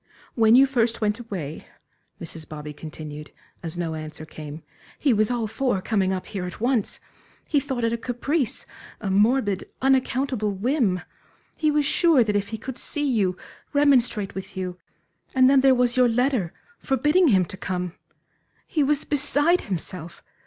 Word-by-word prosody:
"When 225 -1 +5
you 265 +2 +8
first 235 -4 +1
went 210 +1 0
away," 180 -10 -6 0.5
Mrs. 165 -1 -8
Bobby 150 -1 -7
continued, 150 0 -8 0.3
as 165 0 -3
no 170 -2 -2
answer 155 0 -7
came, 155 0 -9 0.3
"he 275 -4 +2
was 215 0 +2
all 240 -2 0
for 225 0 0
coming 190 -1 0
up 185 -1 -3
here 195 -4 -5
at 180 - -7
once. 240 -2 0 0.5
He 295 - +3
thought 265 -4 -3
it 230 0 +1
a - - 0
caprice, 250 +3 -1 0.3
a 200 -3 -3
morbid, 205 0 +2
unaccountable 260 -3 +1
whim; 210 - +1 0.5
he 310 - +1
was 295 -1 +2
sure 310 -3 +4
that 210 -2 -1
if 200 -1 0
he 220 - -5
could 260 +3 -7
see 295 -1 -1
you, 200 -8 +1 0.4
remonstrate 250 -8 +3
with 190 0 -8
you 180 -1 -4 0.6
And 260 -1 +6
then 270 0 +5
there 265 -1 +5
was 245 -1 +2
your 250 -1 +5
letter, 245 - +1 0.3
forbidding 295 +7 +3
him 190 -8 +4
to 190 - -9
come. 180 -2 -3 0.7
He 310 - -1
was 290 +1 +1
beside 290 +4 +2
himself! 175 -3 -5
225 Hz, 165 wpm, -24 LUFS, 185-265 Hz, 0.7 s, you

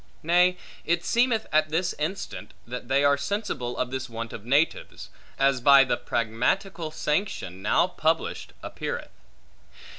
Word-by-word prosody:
Nay, 180 +2 +4 0.3
it 170 +1 0
seemeth 235 -2 +2
at 155 0 +3
this 175 +3 0
instant 175 +7 -4
they 125 +3 -1
are 145 0 +4
sensible, 140 - -3
of 125 0 -2
this 130 -1 -4
want 115 0 -6
of 105 - -8
natives; 145 +6 0 0.3
as 135 -2 +2
by 140 +2 +8
the 130 - 0
Pragmatical 160 - -1
Sanction, 150 - -2
now 105 - +3
published, 165 -2 -1
appeareth. - - -5
150 Hz, 130 wpm, -26 LUFS, 125-175 Hz, 0.3 s, by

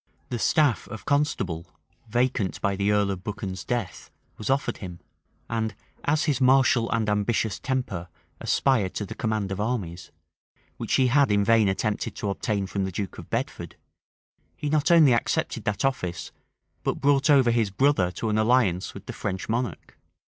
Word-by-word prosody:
The 120 - -2
staff 145 -2 +2
of 105 -2 -9
constable, 100 - 0 0.4
vacant 120 -4 0
by 100 -1 0
the 100 +1 +1
earl 105 -1 +2
of 95 -1 -5
Buchan's 100 -3 -5
death, 120 -7 -4 0.3
was 110 - -5
offered 135 +1 0
him; 90 -3 -8 0.5
and 110 -2 -2 0.3
as 150 +1 +2
his 145 -6 0
martial 130 -2 +4
and 115 -1 0
ambitious 105 +1 0
temper 125 -10 -3 0.3
aspired 115 -9 +1
to 105 - -2
the - - -7
command 110 -4 -2
of 95 +1 -2
armies, 100 -7 -3 0.7
which - - -1
he 130 - +4
had 135 -1 +4
in 100 0 +3
vain 115 -1 +4
attempted 105 +2 -2
to 100 - -2
obtain 100 0 -1
from 95 +1 -2
the 95 - -2
duke 95 0 -5
of - - -11
Bedford, - - -3 0.8
he 150 - -3
not 155 -1 +2
only 160 -7 +7
accepted 115 - -1
that 105 +6 0
office, 90 -11 -2 0.5
but - - -1
brought 140 +2 +3
over 135 -5 +5
his 115 -3 +1
brother 130 -3 +2
to 110 - -3
an 105 0 +1
alliance 110 -6 +2
with - - -10
the - - -6
French 95 -1 -4
monarch. 115 - -3
110 Hz, 170 wpm, -26 LUFS, 100-130 Hz, 0.8 s, only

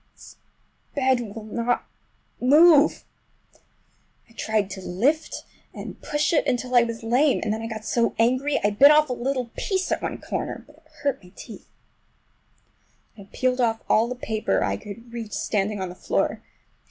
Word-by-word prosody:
This - - -15 0.6
bed 255 -6 0
will 225 - -7
not 235 +3 -1 0.5
move! 300 +3 +5 1.2
I 230 - -22
tried 215 -3 -1
to 195 - -7
lift 245 - -1 0.3
and - - -8
push 295 +3 0
it 310 - +2
until 250 0 -1
I 245 - +7
was 230 -1 -3
lame, 255 +5 +3
and 215 - 0
then 220 - -4
I 225 - -4
got 220 -1 -7
so 235 -1 0
angry 255 +5 +2
I 205 - +3
bit 270 +8 +7
off 300 -1 +5
a - - +1
little 250 -1 -3
piece 380 -2 -2
at - - 0
one - - -3
corner—but 300 - -5
it 320 0 -26 0.2
hurt 280 -7 -1
my 180 - -16
teeth. - - -11 1.5
Then 200 -2 -13
I - - -33
peeled 255 -1 +1
off 225 -2 0
all 225 +2 +3
the 250 - -4
paper 220 -3 -1
I - - 0
could 230 +3 -10
reach 225 -3 -6
standing 205 0 -1
on 185 -1 -3
the - - -8
floor. - - -1
235 Hz, 175 wpm, -24 LUFS, 220-275 Hz, 1.5 s, I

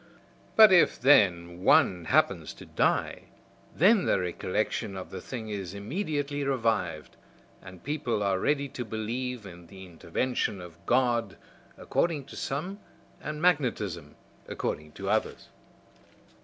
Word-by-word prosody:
But, 220 -2 +9
if, 175 - +4
then 90 -9 +3
one 90 -3 +4
happens - - +1
to - - -12
die, - - 0 0.5
then 195 +4 +4
the - - +2
recollection 95 +3 -2
of 95 - -8
the 95 - -6
thing 115 -4 -7
is 100 -3 -5
immediately 145 - -3
revived, 115 - -1 0.5
and 90 -2 -13
people 140 -8 -2
are 95 -2 +1
ready 140 +5 0
to 130 -2 -5
believe 115 +2 -4
in 85 -3 -12
the 95 +1 -11
intervention 95 +6 -2
of 85 -1 -12
God, 120 -5 +1 0.4
according 155 -5 -1
to 140 - -12
some, 180 +9 -4 0.4
and 150 +1 -5
magnetism, 120 - 0 0.3
according 75 0 -4
to - - -7
others." - - -1
110 Hz, 130 wpm, -28 LUFS, 95-140 Hz, 0.5 s, But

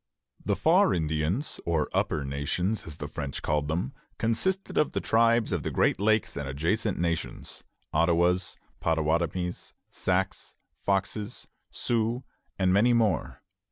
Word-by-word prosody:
The - - +1
"Far - - +4
Indians," 80 - -1
or 80 -3 +1
"Upper 75 -3 0
Nations," 75 +10 -1
as 75 - -7
the 75 - -5
French 75 -2 -5
called 75 -1 0
them, 80 -3 -1 0.2
consisted 185 - 0
of 150 - +2
the - - 0
tribes 115 0 +3
of 90 -4 0
the - - -2
Great - - +2
Lakes 110 +2 +2
and 70 -2 -4
adjacent 90 - 0
regions, 85 -1 -3 0.3
Ottawas, 85 +3 +2 0.2
Pottawattamies, 85 +2 0 0.2
Sacs, 95 +1 -1 0.2
Foxes, 100 +3 -1 0.2
Sioux, 120 +2 -1 0.3
and 95 -2 +3
many 115 +5 +5
more. 110 -7 +1
90 Hz, 130 wpm, -28 LUFS, 80-110 Hz, 0.3 s, many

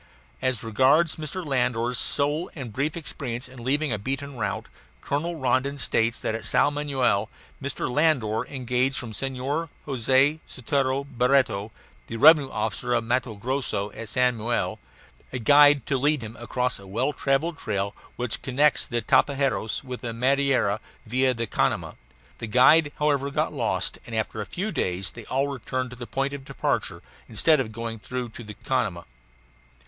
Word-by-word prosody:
As 130 -3 0
regards 135 +9 +3
Mr. 160 +3 -4
Landor's 125 -3 0
sole 145 +4 0
and 130 -8 -7
brief 145 +7 -1
experience 125 -6 -5
in 125 -2 -11
leaving 140 +1 +1
a 105 - -2
beaten 135 +5 -4
route, 115 - -2 0.3
Colonel 155 - -2
Rondon 135 0 0
states 115 -4 +1
that - - -1
at 115 -1 -4
Sao 145 - +3
Manoel 130 -8 0 0.3
Mr. 140 0 -3
Landor 125 -6 +2
engaged 130 0 0
from 115 -4 -5
Senhor 135 +7 -2 0.2
Jose 135 +3 +2
Sotero 135 +1 0
Barreto 125 -5 +1 0.4
(the 115 - -5
revenue 150 +1 +7
officer 110 +2 -1
of 115 - +1
Matto 120 -1 -1
Grosso, 110 -3 -2
at 110 +1 -8
Sao 125 +2 +3
Manoel) 120 0 -2 0.5
a 130 - -3
guide 145 +2 +6
to 135 -3 0
lead 145 -1 +1
him 110 +1 -8
across 125 0 -2
a 100 - -13
well 120 +9 0
travelled 150 +5 0
trail 100 -1 -2 0.2
which 125 -2 -2
connects 140 +3 +2
the 120 -2 -2
Tapajos 135 -2 +1
with 125 -2 -6
the 115 -2 -4
Madeira 130 -4 +2 0.3
via 130 +3 +2
the 115 0 -1
Canama. - - 0 0.5
The 115 - -4
guide, 145 +7 +5
however, 145 -2 +1
got 140 - -1
lost, - - -1
and 115 - -5
after 110 0 -2
a 105 - -6
few 200 +4 -3
days 90 - -1
they 115 -2 -10
all 135 +2 0
returned 130 -1 -3
to - - -8
the 120 -1 -8
point 135 +1 -1
of 140 -1 -6
departure - - -2 0.3
instead 150 +7 +3
of 110 -4 -2
going 115 0 -5
through 125 +2 -4
to 115 +1 -10
the 105 -1 -9
Canama. 100 - -1
130 Hz, 165 wpm, -25 LUFS, 115-140 Hz, 0.5 s, revenue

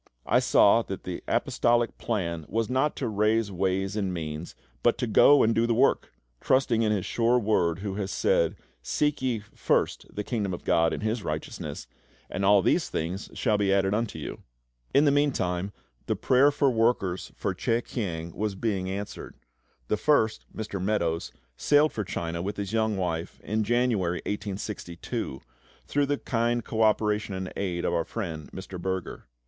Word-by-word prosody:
I - - +4
saw - - +5
that - - -6
the - - -5
Apostolic 120 0 +1
plan 85 -8 -2
was 115 +2 -1
not 135 +3 +1
to 130 - -2
raise 105 0 +1
ways 95 +1 -1
and 100 -3 -1
means, 80 -1 -5 0.3
but - - +3
to - - -1
go 140 +5 +6
and 115 - +3
do 115 +1 +2
the 115 - +2
work, 125 - +2 0.3
trusting 130 -3 +2
in 110 -2 +2
His 100 -4 0
sure 120 +1 +2
Word 100 -7 +1
who 100 - -2
has 100 -2 -2
said, 85 -1 +2 0.3
"Seek 150 - 0
ye 125 -3 0
first 105 -1 -1
the 105 - -4
Kingdom 105 -5 -2
of - - -12
GOD 80 0 +3
and - - -4
His 110 +1 -1
righteousness, - - -5 0.5
and 100 - -2
all 100 0 +5
these - - +2
things 90 +5 -3
shall 110 -4 +1
be 100 -1 +2
added 95 0 +2
unto 115 0 -1
you." - - -6 0.5
In 140 +2 +4
the 145 - +5
meantime 100 -10 0 0.4
the - - +1
prayer 135 +2 +4
for 145 -2 +2
workers 110 -6 0
for - - -2
CHEH 115 +1 0
KIANG 85 -7 -4
was 105 -2 -2
being 95 -3 -1
answered. 100 +2 -6 0.5
The 105 - +1
first, 110 -5 +2
Mr. 105 -3 -5
Meadows, 85 -5 0 0.3
sailed 150 +1 +4
for 105 - -2
China 85 -2 -3
with 100 +3 -4
his 100 +1 -4
young 110 -2 +1
wife 85 -3 -3
in 110 +1 -1
January 110 -7 +1
1862, 100 -8 -4 0.4
through 145 0 +1
the 145 0 0
kind 120 -2 0
co 110 - -2
operation 105 -2 +2
and 95 0 -5
aid 90 -3 -2
of - - 0
our 85 - +1
friend 80 -6 -5
Mr. 95 -1 -8
Berger. 95 -6 -4
105 Hz, 175 wpm, -27 LUFS, 95-115 Hz, 0.5 s, go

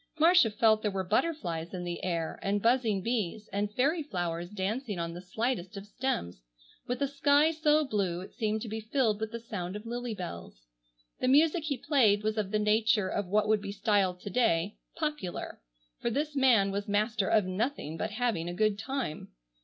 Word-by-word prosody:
Marcia 335 -6 +6
felt 220 0 +3
there 210 - 0
were 195 -1 -2
butterflies 180 - -1
in 180 - -4
the 175 -1 -5
air, 170 -3 -2
and 200 +1 0
buzzing 230 -5 +2
bees, 220 -2 -2
and 205 +1 -1
fairy 295 +6 +2
flowers 175 - -3
dancing 210 +2 -3
on 170 0 -3
the 175 - -7
slightest 210 +1 -2
of 195 - -7
stems, 205 - -3 0.5
with 245 +3 -1
a - - +2
sky 285 +2 +3
so 310 -1 +3
blue 195 -8 -1
it 185 - -10
seemed 215 -1 -1
to - - -6
be 220 +1 -4
filled 220 -1 0
with 220 -1 -2
the 235 - -5
sound 200 -6 -5
of 210 +2 -7
lily 240 -1 -4
bells. 85 - -8 0.5
The 255 - 0
music 310 +4 +4
he 285 -4 -1
played 245 -9 +3
was 215 0 0
of 200 -3 -1
the 215 - +1
nature 210 -1 +2
of 205 -1 -2
what 210 +3 +2
would 215 -1 +3
be 200 -1 -5
styled 200 -3 +1
to 200 - -6
day 200 -5 +1 0.2
"popular," 300 - -4 0.4
for - - -1
this 290 +5 -2
man 240 -8 +4
was 200 +2 -3
master 210 0 +1
of 215 -3 +3
nothing 185 - -2
but - - -2
having 215 -7 -1
a 175 - -5
good 215 0 +1
time. 250 - -4
215 Hz, 195 wpm, -30 LUFS, 190-250 Hz, 0.5 s, Marcia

